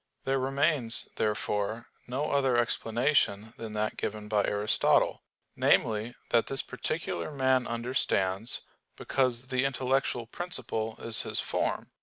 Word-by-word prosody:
There 135 0 +1
remains, 135 -2 +1
therefore, 105 +1 -1 0.2
no 135 +5 -2
other 135 -3 +2
explanation 115 -2 +1
than 110 -2 -7
that 110 0 -2
given 105 0 -4
by 105 -1 +2
Aristotle 105 +2 +2 0.3
namely, 110 +2 +2 0.2
that 115 - +3
this 135 - +4
particular 155 0 -3
man 130 -3 +1
understands, 115 -4 0 0.3
because 130 -1 0
the 130 0 +1
intellectual 135 -2 0
principle 115 -6 -3
is 115 - +2
his - - -2
form. - - -2
120 Hz, 120 wpm, -29 LUFS, 110-135 Hz, 0.3 s, this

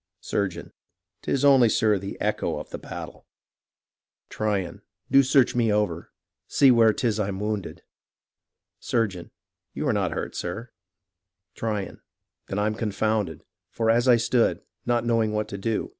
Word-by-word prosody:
Surgeon 90 -5 -3 0.5
'Tis 140 +1 0
only, 135 -5 +6
sir, 105 -2 +2
the 100 +1 -7
echo - - -1
of - - -8
the - - -6
battle. - - -9 1.0
Tryon 100 -4 -2 0.3
Do 135 - +7
search 135 -1 +3
me 115 -3 +2
over 105 -6 -1 0.2
— - - -64
see 135 -2 +5
where 115 -2 +5
'tis 110 -1 -1
I'm 100 -2 -2
wounded. 105 -2 -4 1.0
Surgeon 100 -7 -2 0.5
You 150 - -2
are 130 - +2
not 100 -4 0
hurt, - - -4
sir. 115 +8 -5 0.8
Tryon 105 -4 -4 0.5
Then 95 - -4
I'm 105 +1 +1
confounded; 110 -5 -2 0.2
For 115 -1 +1
as 120 +2 +2
I 125 - +7
stood, 120 +1 +1 0.2
not 120 -1 +1
knowing 115 -2 +1
what 105 0 -1
to 100 - -5
do. 110 +2 -2
110 Hz, 145 wpm, -25 LUFS, 100-120 Hz, 1.0 s, Do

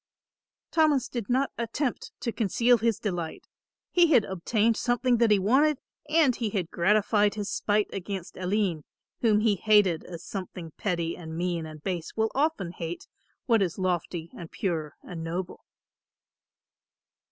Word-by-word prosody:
Thomas 305 -5 +3
did 235 -5 -5
not 265 +3 +1
attempt 235 +3 -2
to 235 - -1
conceal 235 +3 +3
his 230 -1 +1
delight. 175 -6 -4 0.5
He 350 -1 +5
had 235 -6 +5
obtained 210 +5 +1
something 245 +1 +1
that 230 -1 +4
he 210 - +5
wanted 265 +10 +3 0.3
and 305 -6 +4
he 230 -3 -2
had 190 -5 -2
gratified 205 +3 +3
his 205 -2 -3
spite 210 0 +1
against 195 -1 -5
Aline, 185 -4 0 0.4
whom 215 -3 +3
he 215 -2 +3
hated 205 -5 +4
as 170 -1 -8
something 180 -4 -6
petty 170 -4 -1
and 160 -2 -8
mean 170 -2 -1
and 155 -1 -11
base 175 -4 -4
will 220 0 +1
often 275 - 0
hate 170 -1 -6 0.4
what 230 -5 +3
is 180 -4 0
lofty 175 -3 -2
and 170 -2 -8
pure 160 -6 -3
and 165 -2 -7
noble. 175 +2 -5
205 Hz, 150 wpm, -27 LUFS, 175-230 Hz, 0.5 s, He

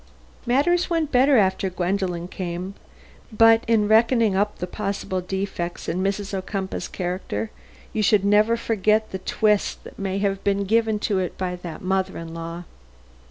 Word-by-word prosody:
Matters 345 +9 +2
went 325 -3 0
better 265 +2 +5
after 190 -1 +2
Gwendolen 180 -1 -2
came, 180 +1 -5 0.6
but 225 +1 +5
in 220 -2 +3
reckoning 225 -1 +4
up 205 +2 0
the - - -3
possible 195 -1 -3
defects 185 -2 -4
in 180 - -1
Mrs. 195 +1 -2
Ocumpaugh's 190 0 -3
character 185 +4 -4 0.4
you 220 - 0
should 205 -1 +3
never 210 +3 +4
forget 215 -1 +1
the 190 - -4
twist 210 +2 0
that - - -13
may 195 -1 -2
have 195 -1 -1
been 200 0 +1
given 220 +1 +2
to 200 -3 +1
it 180 -2 -3
by 180 -1 -2
that 170 -2 -8
mother 190 0 -1
in 165 0 -7
law." 165 +1 -6
195 Hz, 160 wpm, -23 LUFS, 185-220 Hz, 0.6 s, better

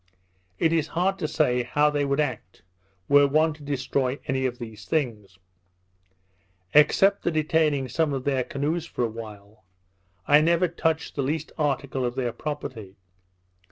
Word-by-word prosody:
It 165 +8 +2
is 160 -2 +1
hard 195 +2 +1
to 155 - -1
say 135 -5 +1
how 145 +5 +2
they 145 -1 0
would 140 +1 0
act, 120 - -3 0.4
were 145 0 +6
one 155 +3 +2
to 150 - -17
destroy 135 -2 -1
any 130 0 0
of 125 -1 -6
these 110 -4 -9
things. 110 - -2 1.4
Except 195 +7 +5
the - - 0
detaining 155 -3 +1
some 150 +5 0
of 135 -2 -3
their 135 -2 0
canoes 155 +6 -2
for 125 - -3
a - - +2
while, 105 -2 -11 0.6
I 145 +1 +6
never 170 +3 +3
touched 160 -1 -1
the 140 - -1
least 150 +3 -2
article 140 -3 -1
of 120 0 -2
their 125 -3 -2
property. 125 -10 -6
140 Hz, 155 wpm, -25 LUFS, 125-155 Hz, 1.4 s, were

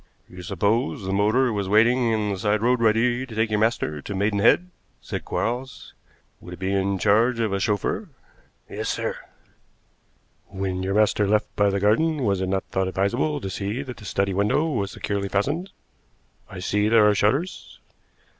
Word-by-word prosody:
"You 90 0 -11
supposed 100 - -1
the 95 - -2
motor 110 +5 +2
was 100 -2 -2
waiting 115 +3 +4
in 105 -2 0
the 95 - -4
side 105 +2 0
road 125 +1 +3
ready 115 +3 +2
to 125 -4 -9
take 110 0 0
your 105 - +1
master 105 -9 0
to 100 - -6
Maidenhead," 105 - +2 0.3
said - - -6
Quarles. 125 +3 -4 0.5
"Would 90 - -9
it - - -22
be 95 +1 -1
in 100 0 0
charge 115 +5 +2
of 110 -3 0
a 100 - 0
chauffeur?" 105 - -1 0.6
"Yes, - - -4
sir." - - -2 1.3
"When 95 -1 -3
your 95 +1 -2
master 105 -1 +3
left 105 +1 0
by 100 -1 +3
the 100 0 -1
garden 140 +9 +2
was 100 -4 +1
it 95 - -1
not 95 0 0
thought 95 0 0
advisable 120 +11 0
to 95 - -4
see 105 +8 -3
that 125 -5 -8
the 105 - -12
study 100 -1 -1
window 105 - +1
was 100 -8 -1
securely 100 -1 -3
fastened? 145 - -1 0.8
I 95 - -9
see 105 +3 +1
there 110 -2 +5
are 105 - +4
shutters." 135 - -1
105 Hz, 180 wpm, -24 LUFS, 100-120 Hz, 1.3 s, there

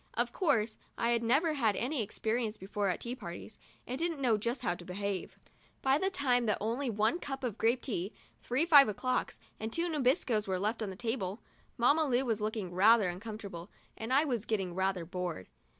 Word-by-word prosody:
Of 240 +1 0
course, 225 - +1 0.2
I 235 - +1
had 235 -1 +2
never 275 +8 +3
had 225 -8 +2
any 255 +4 -1
experience 220 +1 -2
before 200 +1 -2
at 180 - -2
tea 240 - -3
parties, 175 -2 -8 0.3
and 255 +3 -4
didn't 335 -2 -1
know 245 -5 +3
just 235 +4 -2
how 175 - +1
to 175 - -10
behave. 190 +1 -4 0.5
By 270 +2 +4
the 385 - +1
time 250 -9 +1
that 210 - +2
only 240 +5 -1
one 215 0 +2
little 350 - -9
cup 270 -1 -4
of 230 -4 -3
grape 235 +3 +2
tea, 200 -5 -2 0.3
three 260 +7 +1
five 290 -6 +8
o'clocks 255 +5 -1 0.2
and 220 +1 -4
two 335 +7 0
Nabiscos 260 - +1
were 190 -1 0
left 215 +5 -1
on 215 - -2
the 190 - -6
table, 220 -2 -3 0.3
Mamma 285 +7 +4
Lu 260 -1 +2
was 225 -4 0
looking 210 -4 -3
rather 205 +1 +5
uncomfortable 195 -2 -7 0.3
and 225 +3 -5
I 280 +4 +5
was 240 -7 -2
getting 195 -5 -1
rather 190 -1 0
bored. 180 - -4
225 Hz, 200 wpm, -32 LUFS, 200-255 Hz, 0.5 s, five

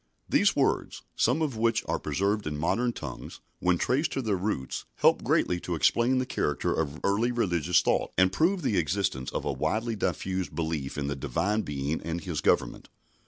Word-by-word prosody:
These - - +3
words - - 0
some 160 - +2
of 140 -6 -2
which 115 +1 +1
are - - 0
preserved 100 -1 -1
in 75 -1 -3
modern 120 +11 +1
tongues 75 - -8 0.2
when 90 -1 +2
traced 135 - +1
to 135 - -2
their 105 -3 +1
roots, 90 -9 -3
help - - +3
greatly 90 - +1
to 85 0 -3
explain 120 +10 +3
the 130 - +1
character 75 - -1
of 75 -2 -2
early 110 +5 +2
religious 90 -8 +2
thought, - - +1
and 95 0 +5
prove 175 - +2
the 105 -7 +1
existence 80 -6 -1
of - - -4
a - - 0
widely 115 +1 -1
diffused 95 -2 -2
belief 80 -5 -3
in 70 - -2
the 70 0 -2
Divine 100 - 0
Being 75 0 -3
and 85 +1 -3
His 85 -5 -4
government. - - +1
95 Hz, 185 wpm, -28 LUFS, 80-115 Hz, 0.2 s, and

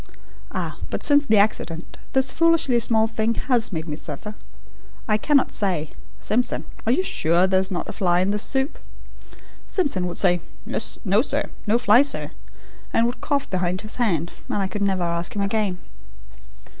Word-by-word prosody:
Ah, - - -4
but - - -3
since 290 0 +5
the 220 -5 +3
accident 180 -5 0
this 265 0 +3
foolishly 330 -7 +3
small 225 -1 +3
thing 225 0 -1
HAS 245 -5 +1
made 160 -2 -4
me 150 - -3
suffer! 160 +8 -6 0.7
I 215 -2 +3
cannot 285 +3 +3
say: 175 -7 -1 0.3
'Simpson, 240 +4 0 0.2
are - - +4
you 320 +9 +2
sure 170 - +2
there 190 0 +3
is 190 0 0
not 180 -3 -3
a - - -5
fly 180 -3 +2
in 190 +2 +1
this 210 0 0
soup?' 265 +4 -1 0.9
Simpson 270 - 0
would 175 - -5
say: 180 -3 +3 0.2
'No 200 0 0
sir; 285 +2 -2 0.2
no 220 +3 +4
fly 240 0 +6
sir,' 285 0 -1 0.6
and 230 - +3
would 240 +1 -3
cough 285 -2 0
behind 185 0 -1
his 215 - -6
hand, 175 -9 0 0.2
and - - -1
I 195 -1 0
could 205 +2 -5
never 190 -3 +1
ask 170 +2 -2
him 200 - 0
again." 200 -2 0
210 Hz, 175 wpm, -23 LUFS, 180-245 Hz, 0.9 s, fly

